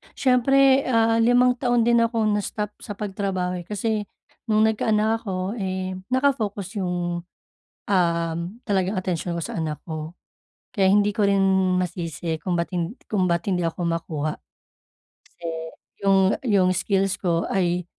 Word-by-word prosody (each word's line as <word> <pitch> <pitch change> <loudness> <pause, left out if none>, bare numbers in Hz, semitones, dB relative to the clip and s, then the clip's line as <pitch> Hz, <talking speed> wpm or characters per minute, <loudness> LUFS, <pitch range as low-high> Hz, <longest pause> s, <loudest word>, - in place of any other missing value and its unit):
siyempre, 270 +1 +4
ah, 230 -2 +3
limang 245 +1 +4
taon 245 -2 +2
din 235 0 +4
ako 230 -1 +1
na-stop 210 0 -2
sa 205 - -7
pagtrabaho, 190 -3 -2
eh. 175 - -11
Kasi 210 0 -2 0.4
nung 215 -1 +3
nagkaanak 220 0 +2
ako, 185 0 -2
eh, 185 -1 -2 0.2
naka-focus 220 -7 0
yung, 175 -1 -2 0.6
uhm, 170 -3 +1 0.3
talagang 195 -2 0
atensyon 175 -1 -2
ko 170 - -3
sa - - -5
anak 155 -1 -3
ko. 155 -1 -5 0.6
Kaya 195 -4 +2
hindi 205 +1 +4
ko 205 0 +1
rin 195 -1 +3 0.3
masisi 165 -3 -3
kung 175 +2 -2
ba't 170 +2 -2
hin 175 +4 -2 0.2
kung 190 -3 +2
ba't 170 -1 0
hindi 180 -2 +1
ako 165 +2 -4
makuha. 160 -3 -2 0.9
Kasi, 175 - -19 0.6
yung 195 -1 +4 0.2
yung 200 -7 +3
skills 195 +1 0
ko 170 -3 +1
ay 180 -2 +1
195 Hz, 145 wpm, -24 LUFS, 175-220 Hz, 0.9 s, siyempre